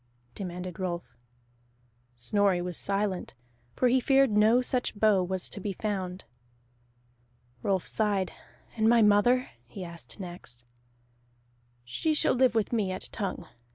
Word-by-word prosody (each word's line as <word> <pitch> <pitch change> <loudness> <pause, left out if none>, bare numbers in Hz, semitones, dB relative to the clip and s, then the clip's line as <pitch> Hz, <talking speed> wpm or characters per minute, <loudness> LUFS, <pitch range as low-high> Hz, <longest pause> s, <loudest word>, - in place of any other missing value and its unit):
demanded 180 -1 -6
Rolf. 175 -2 -4 1.0
Snorri 195 - +2
was 175 0 -4
silent, 195 -4 -2 0.4
for 255 - +3
he 255 +2 +4
feared 270 -1 +4
no 215 +3 +5
such 250 -1 0
bow 210 -3 +4
was 185 0 -1
to - - -7
be 200 0 -3
found. 190 -3 -3 1.4
Rolf 190 +2 0
sighed. 205 -4 0 0.4
"And 220 -1 +3
my 235 -1 +6
mother?" 240 +5 +4 0.2
he 185 +10 -8
asked 170 +3 -10
next. 175 -10 -8 1.2
"She 310 - -1
shall - - +3
live 255 -2 +3
with 220 +1 0
me 205 -5 +1
at 185 - -5
Tongue. 200 -5 -4
200 Hz, 130 wpm, -28 LUFS, 180-225 Hz, 1.4 s, my